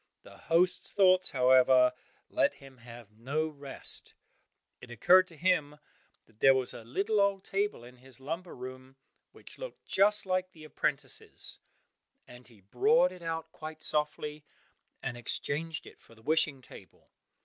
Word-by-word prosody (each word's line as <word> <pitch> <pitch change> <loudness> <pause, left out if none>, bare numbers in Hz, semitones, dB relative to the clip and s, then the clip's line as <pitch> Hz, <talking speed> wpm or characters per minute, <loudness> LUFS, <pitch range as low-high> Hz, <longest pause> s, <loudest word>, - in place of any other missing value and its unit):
The - - -15
host's 175 +2 +2
thoughts, 185 -2 +4
however, 130 -1 +5 0.3
let - - +1
him 135 -1 -15
have 120 -2 -13
no 135 +9 -2
rest; 140 -3 -7 0.6
it - - -12
occurred 180 +11 +5
to 165 - -16
him 150 -4 +1 0.5
that 110 -1 -28
there 135 +2 +6
was 130 -1 -2
a 115 - -9
little 200 - 0
old 200 -1 +1
table 200 - -2
in 125 +1 -14
his 130 0 -17
lumber 165 +6 -5
room 130 +1 -9 0.4
which - - -15
looked - - -9
just 205 +2 +2
like 185 0 -1
the 155 - -14
apprentice's 145 -3 -4 0.7
and 125 0 -14
he 115 -5 -19
brought 180 - +3
it 180 -1 -12
out 165 -1 -4
quite 155 0 -9
softly, 150 0 -2 0.6
and 120 - -4
exchanged 155 +6 -4
it - - -15
for 115 - -19
the 110 - -20
wishing 150 -2 0
table. - - -16
150 Hz, 150 wpm, -30 LUFS, 125-180 Hz, 0.7 s, there